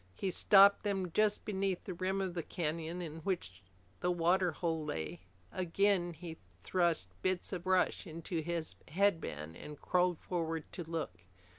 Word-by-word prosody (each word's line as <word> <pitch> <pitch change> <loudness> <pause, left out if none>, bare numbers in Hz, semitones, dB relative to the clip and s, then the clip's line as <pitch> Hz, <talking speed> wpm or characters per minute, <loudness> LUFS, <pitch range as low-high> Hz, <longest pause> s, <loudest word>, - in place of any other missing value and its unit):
He 190 - -1
stopped 200 +2 +7
them 195 -4 -1
just 210 +3 +2
beneath 195 -3 -1
the 185 - -5
rim 190 +2 -1
of 190 -2 -2
the 170 - -2
canyon 165 +1 -3
in 160 -1 -6
which 155 - -3 0.4
the 180 - 0
water 175 +1 +3
hole 160 -1 -1
lay. 85 - -4 0.3
Again 185 0 +2
he 165 0 -8 0.2
thrust 170 - +1
bits 185 +1 -1
of 180 -1 -4
brush 185 +1 +2
into 165 +1 -3
his 165 0 -2
headband 160 - 0
and 150 - -9
crawled 180 -1 +2
forward 165 -2 -2
to 175 - -5
look. 160 - -4
175 Hz, 155 wpm, -34 LUFS, 160-185 Hz, 0.4 s, stopped